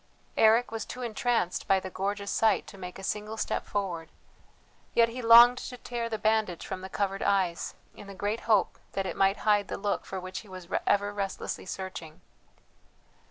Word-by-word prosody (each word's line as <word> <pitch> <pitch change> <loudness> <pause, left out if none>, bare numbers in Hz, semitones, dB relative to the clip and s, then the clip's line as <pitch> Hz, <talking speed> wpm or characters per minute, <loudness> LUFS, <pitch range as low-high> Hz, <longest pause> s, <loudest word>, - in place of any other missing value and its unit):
Eric 225 +2 +4
was 225 0 -3
too 250 - -7
entranced 230 -5 -1
by 195 - +4
the 190 0 -7
gorgeous 200 +2 -2
sight 220 -1 +2
to 200 - -12
make 180 -1 -7
a 195 - -10
single 210 +2 -3
step - - -2
forward. 180 -5 -3 0.9
Yet 230 -1 +5
he 250 +2 -6
longed 235 +2 +8
to 250 - -7
tear 240 -1 -4
the 220 - -2
bandage 215 -5 0
from 185 - -5
the 190 - -7
covered 195 0 -2
eyes, 185 -4 0 0.2
in 205 - -11
the 200 - -9
great 205 +4 -2
hope 210 -4 +3
that 195 0 -1
it 185 - -3
might 195 +1 +3
hide 205 -2 +3
the - - -4
look 200 0 -2
for 190 - -4
which 185 +1 -6
he 210 - -14
was 185 -2 -9 0.2
ever 205 0 +2
restlessly 195 -1 -4
searching. 185 -3 -7
200 Hz, 190 wpm, -29 LUFS, 190-220 Hz, 0.9 s, longed